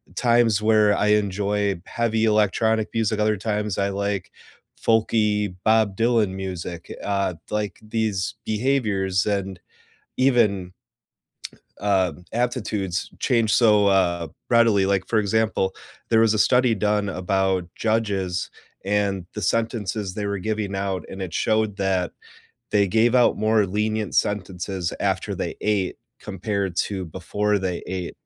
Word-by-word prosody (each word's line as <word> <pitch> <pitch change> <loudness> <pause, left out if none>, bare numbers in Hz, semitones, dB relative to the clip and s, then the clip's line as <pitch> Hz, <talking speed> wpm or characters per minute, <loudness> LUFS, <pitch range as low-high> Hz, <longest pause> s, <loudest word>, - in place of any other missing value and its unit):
times 115 -3 +3
where 105 -1 +4
I 105 - +1
enjoy 100 -2 +1
heavy 115 -1 0
electronic 110 +1 +2
music, 110 -1 0
other 105 0 +2
times 105 -1 -2
I 100 0 +1
like 100 -1 -3 0.5
folky 105 -3 +2
Bob 110 -3 +3
Dylan 115 -3 +2
music, 90 -3 -6
uh, 100 -2 0 0.2
like, 105 -1 -2
these 110 -4 -1
behaviors, 105 -5 0
and 95 -3 -2 0.6
even 105 -9 +2 1.1
uh, 95 -3 +2 0.2
aptitudes 110 -6 -2
changed 115 -5 +2
so, 105 -4 +5
uh, 90 -4 +2 0.2
readily, 115 -5 +4
like, 95 -1 0
for 110 - +1
example, 105 -2 +1 0.4
there 110 -1 +5
was 110 -1 +4
a - - 0
study 125 +1 +4
done 105 0 0
about 95 0 0
judges 100 -5 -1 0.3
and 100 -2 0
the - - -5
sentences 105 -2 -1
they 105 -1 -3
were 100 0 -2
giving 105 0 -3
out, 95 -3 -2
and 95 - -6
it 90 -3 -5
showed 110 +1 0
that 95 -3 0 0.6
they 100 -1 +3
gave 115 +4 +3
out 125 -1 +4
more 110 -1 +3
lenient 105 +1 -2
sentences 95 -2 -1
after - - -1
they - - -4
ate, 105 -3 0 0.2
compared 100 -2 -3
to 95 0 -1
before 100 +5 -1
they 90 -2 -3
ate. 90 -1 -4
105 Hz, 130 wpm, -23 LUFS, 95-110 Hz, 1.1 s, so